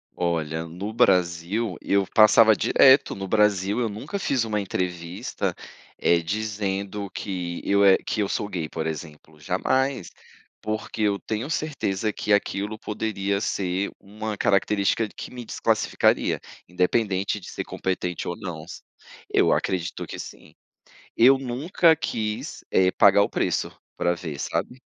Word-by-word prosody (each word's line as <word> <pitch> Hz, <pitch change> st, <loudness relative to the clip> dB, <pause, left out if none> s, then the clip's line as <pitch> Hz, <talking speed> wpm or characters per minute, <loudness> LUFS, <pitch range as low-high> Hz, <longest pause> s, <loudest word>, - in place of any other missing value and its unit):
Olha, 80 Hz, -2 st, -1 dB
no 95 Hz, +6 st, -6 dB
Brasil 90 Hz, -1 st, +1 dB
eu 100 Hz, -1 st, +1 dB
passava 110 Hz, +1 st, +6 dB
direto, 135 Hz, +1 st, +5 dB
no 95 Hz, -1 st, -5 dB
Brasil 105 Hz, 0 st, +2 dB
eu 120 Hz, -, +1 dB
nunca 110 Hz, -, -5 dB
fiz 130 Hz, -9 st, +1 dB
uma 105 Hz, -2 st, -1 dB
entrevista, 90 Hz, -2 st, -3 dB, 0.4 s
eh, 85 Hz, 0 st, +3 dB
dizendo 100 Hz, 0 st, -3 dB
que 90 Hz, -4 st, -4 dB
eu 100 Hz, 0 st, +3 dB
e 95 Hz, -, +7 dB
que 110 Hz, -, -4 dB
eu 100 Hz, -, 0 dB
sou 105 Hz, -, -2 dB
gay, 85 Hz, -5 st, -3 dB
por 80 Hz, 0 st, -4 dB
exemplo, 75 Hz, -1 st, -8 dB
jamais. 130 Hz, -, 0 dB, 0.5 s
Porque 110 Hz, +1 st, -4 dB
eu 100 Hz, -1 st, +2 dB
tenho 110 Hz, +8 st, -4 dB
certeza 110 Hz, -10 st, -2 dB
que 105 Hz, -, -3 dB
aquilo 100 Hz, +1 st, 0 dB
poderia 100 Hz, -2 st, -2 dB
ser 95 Hz, -2 st, -1 dB
uma 105 Hz, +1 st, -6 dB
característica 100 Hz, +2 st, +2 dB
que -, -, -7 dB
me 125 Hz, -1 st, -7 dB
desclassificaria, -, -, +1 dB, 0.3 s
independente 95 Hz, +2 st, 0 dB
de 90 Hz, -, -11 dB
ser -, -, -4 dB
competente 90 Hz, -2 st, -3 dB
ou 85 Hz, -, -2 dB
não. 85 Hz, -7 st, -6 dB, 0.7 s
Eu -, -, +4 dB
acredito 90 Hz, -2 st, -2 dB
que -, -, -8 dB
sim. -, -, -10 dB, 0.6 s
Eu 130 Hz, +4 st, +6 dB
nunca 150 Hz, +6 st, +2 dB
quis, 110 Hz, -8 st, -4 dB
eh, 95 Hz, 0 st, +4 dB
pagar 100 Hz, 0 st, +5 dB
o -, -, -1 dB
preço -, -, -1 dB, 0.2 s
pra 85 Hz, -, +1 dB
ver, 80 Hz, -5 st, -6 dB
sabe. 130 Hz, +2 st, -3 dB
100 Hz, 140 wpm, -24 LUFS, 90-110 Hz, 0.7 s, e